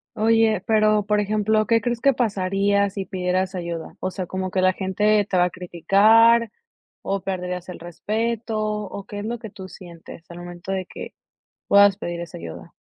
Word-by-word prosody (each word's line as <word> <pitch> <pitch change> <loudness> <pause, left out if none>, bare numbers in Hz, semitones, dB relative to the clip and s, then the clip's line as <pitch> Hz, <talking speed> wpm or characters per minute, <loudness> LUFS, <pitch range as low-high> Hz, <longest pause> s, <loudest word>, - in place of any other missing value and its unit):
Oye, 220 -2 +2
pero 215 -1 +3
por 210 0 +1
ejemplo, 215 +1 +1
¿qué 230 -1 +4
crees 235 +1 -3
que 275 +2 +4
pasaría 200 -3 +1
si 195 0 -5
pidieras 185 0 -1
ayuda? 170 -3 -5
O 185 - -2
sea, 185 0 -5
¿como 185 +1 -4
que 185 0 0
la 185 0 +3
gente 205 +3 +1
te 185 - +1
va 180 - +4
a - - -1
criticar 215 +6 +4 0.5
o 195 0 -2
perderías 180 -1 -4
el 180 - -8
respeto? 220 +6 -3
O, 210 -2 -4
¿qué 205 - -7
es 205 - -5
lo 235 +2 -3
que 225 -1 -9
tú 190 -2 -10
sientes, 170 -2 -13
al 170 - -9
momento 175 +1 -8
de 190 -1 -2
que - - -9 0.5
puedas 200 -1 +6
pedir 175 -3 -5
esa 170 -2 -8
ayuda? 85 -1 -9
195 Hz, 185 wpm, -22 LUFS, 180-215 Hz, 0.5 s, puedas